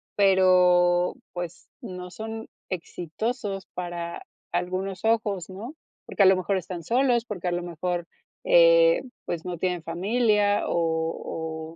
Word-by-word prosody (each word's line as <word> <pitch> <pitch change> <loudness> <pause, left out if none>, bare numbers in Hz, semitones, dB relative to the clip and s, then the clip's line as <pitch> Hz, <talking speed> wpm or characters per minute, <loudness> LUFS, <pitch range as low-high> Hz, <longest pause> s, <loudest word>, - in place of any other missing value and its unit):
pero, 180 -2 +4 0.2
pues, 175 -1 -7
no 180 -5 -7
son 220 +3 -6 0.2
exitosos 195 +4 -4
para 175 -1 -5 0.3
algunos 185 +2 -2
ojos, 215 -5 +1
¿no? 220 +10 -8 0.3
Porque 200 - +2
a - - +6
lo 190 0 +7
mejor 185 +1 0
están 175 -1 -6
solos, 245 - +2
porque 185 -6 -5
a 175 - +1
lo 175 0 -2
mejor, 175 0 -3 0.4
eh, - - +6 0.2
pues, 170 -1 -4
no 175 -2 -4
tienen 180 -1 -1
familia, 205 +4 +2
o 160 -1 -2
185 Hz, 130 wpm, -26 LUFS, 175-215 Hz, 0.4 s, lo